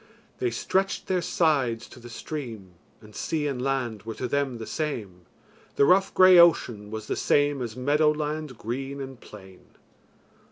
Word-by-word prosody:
They 125 - +1
stretched 190 +11 -1
their 185 -1 0
sides 135 -10 +1
to - - -13
the 120 0 -11
stream, 115 -7 -7 0.3
And 105 -1 -16
sea 155 -2 -2
and 135 -4 -2
land 125 -5 -2
were 115 +1 -7
to 125 - -3
them 140 -1 -1
the 115 - -7
same, 105 - -5 0.5
The 140 - +4
rough 190 +4 +4
grey 185 -1 +8
ocean 120 -11 +4
was 110 0 -6
the - - -2
same 145 -1 +2
As 115 -3 -5
meadow 145 +4 +2
land 150 -3 -3
green 135 +5 -5
and 135 -2 -8
plain. 95 -3 -13
135 Hz, 165 wpm, -26 LUFS, 115-150 Hz, 0.5 s, grey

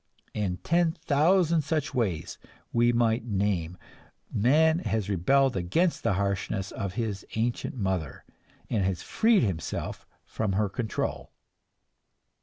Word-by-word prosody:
In 95 -4 -1
ten 170 - +1
thousand 165 +2 +3
such 150 0 -2
ways 95 - -2 0.3
we 120 0 +4
might 115 -1 +2
name, 95 -6 -1 0.6
man 155 +9 +4
has 110 - -2
rebelled 135 +9 +3
against 95 - +1
the - - +1
harshness 100 0 -2
of 100 -3 -4
his 105 -4 -2
ancient 115 +3 -1
mother, 95 - -3 0.4
and 105 -4 0
has 95 -2 -1
freed 225 - +3
himself 90 -7 -3 0.2
from 105 -3 -2
her 100 +1 +1
control. 110 +2 -3
110 Hz, 120 wpm, -27 LUFS, 95-140 Hz, 0.6 s, we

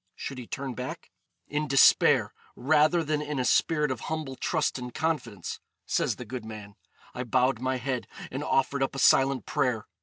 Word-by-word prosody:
Should 135 - -6
he 120 - -9
turn 135 -2 -4
back? 125 +1 -7 0.4
'In 150 +1 -2
despair, 135 -1 +5 0.2
rather 155 +4 +3
than 150 -1 -1
in 150 -1 -4
a 130 - 0
spirit 150 +1 +2
of 130 - -3
humble 155 0 -4
trust 155 -1 -1
and 125 0 -6
confidence,' 125 - -3 0.3
says - - 0
the - - -8
good 125 -3 -6
man, 105 -2 -9 0.4
'I 125 0 -4
bowed 125 0 +2
my 130 0 0
head, 125 0 -3 0.2
and 135 +3 -4
offered 140 0 +1
up 135 - 0
a - - -4
silent 135 0 +4
prayer. 125 -6 0
135 Hz, 180 wpm, -27 LUFS, 125-150 Hz, 0.4 s, despair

